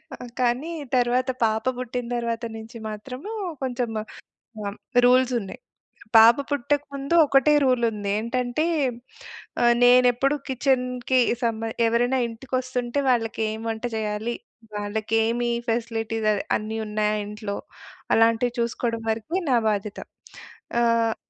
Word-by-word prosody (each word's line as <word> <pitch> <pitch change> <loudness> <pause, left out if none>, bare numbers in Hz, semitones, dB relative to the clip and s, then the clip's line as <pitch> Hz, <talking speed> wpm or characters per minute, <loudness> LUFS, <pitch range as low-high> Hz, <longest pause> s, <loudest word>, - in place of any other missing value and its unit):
ఆ! - - -17 0.2
కానీ 250 +6 0 0.2
తరువాత 250 +1 +2 0.2
పాప 220 +1 0
బుట్టిన 250 -1 -4
తరువాత 235 0 -2
నుంచి 225 +2 -10
మాత్రము 250 - -7 0.3
కొంచెం 245 -2 -2
ఆహ్, 215 - -12 0.6
హ్మ్. 200 0 -5 0.3
రూల్సున్నాయి. 250 -4 +2 0.6
పాప 225 +2 +8
పుట్టక 285 +1 0
ముందు 275 +4 -1
ఒకటే 275 +1 +4
రూల్ 250 -2 +2
ఉంది. 205 -2 -5
ఏంటంటే 245 +6 -1 1.0
ఆహ్, 240 0 +5
నేనెప్పుడు 250 +3 +5
కిచెన్‌కి 255 -1 +1 0.2
సంబ 225 -1 0 0.3
ఎవరైనా 245 +3 +2
ఇంటికొస్తుంటే 250 +2 -3
వాళ్ళకేం 225 -2 0
వంట 220 +1 -4
చేయాలి? 215 +2 -2 0.4
వాళ్ళకి 210 +2 -3
ఏమి 240 +1 0 0.2
ఫెసిలిటీస్ 225 -1 -1
అవి 205 - -1 0.2
అన్నీ 215 +1 -5
ఉన్నాయా 210 0 0
ఇంట్లో? 210 -1 -5 0.6
అలాంటివి 230 +2 +3
చూసుకోవడం 235 -1 -2
వరకే 230 - -2
నా 245 - +5
బాధ్యత. 205 -1 -3 0.8
ఆహ్, 230 -1 +2
235 Hz, 115 wpm, -24 LUFS, 220-255 Hz, 1.0 s, పాప